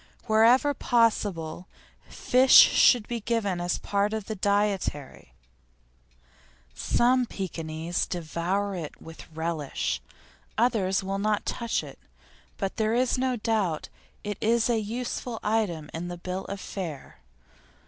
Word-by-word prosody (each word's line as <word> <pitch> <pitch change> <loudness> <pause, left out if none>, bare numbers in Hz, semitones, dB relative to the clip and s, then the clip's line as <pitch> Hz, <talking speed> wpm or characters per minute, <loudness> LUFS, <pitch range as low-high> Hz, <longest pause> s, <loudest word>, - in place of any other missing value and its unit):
Wherever 235 +6 +4
possible, 200 - 0 0.4
fish 255 +1 +3
should 240 -5 +7
be 240 -1 -3
given 205 -5 -1
as 175 0 -1
part 200 +1 -1
of 220 -2 -3
the 220 - -4
dietary; 200 - -1 1.4
some 250 +1 +2
Pekinese 165 -3 -3
devour 180 +4 -2
it 165 -5 -6
with 165 0 -12
relish; 160 -2 -3 0.6
others 210 -5 +1
will 195 +1 -3
not 210 0 0
touch 235 -1 -2
it, - - -11 0.6
but 195 -2 -3
there 220 +1 +1
is 255 +1 +1
no 260 -1 +1
doubt 210 -8 -1 0.3
it 205 -1 -4
is 235 +2 +2
a 230 - +2
useful 235 +1 -4
item 205 -8 -1
in 165 +2 -4
the 175 0 -6
bill 185 +2 -5
of 200 0 -6
fare. 170 -8 -7
205 Hz, 125 wpm, -27 LUFS, 175-230 Hz, 1.4 s, should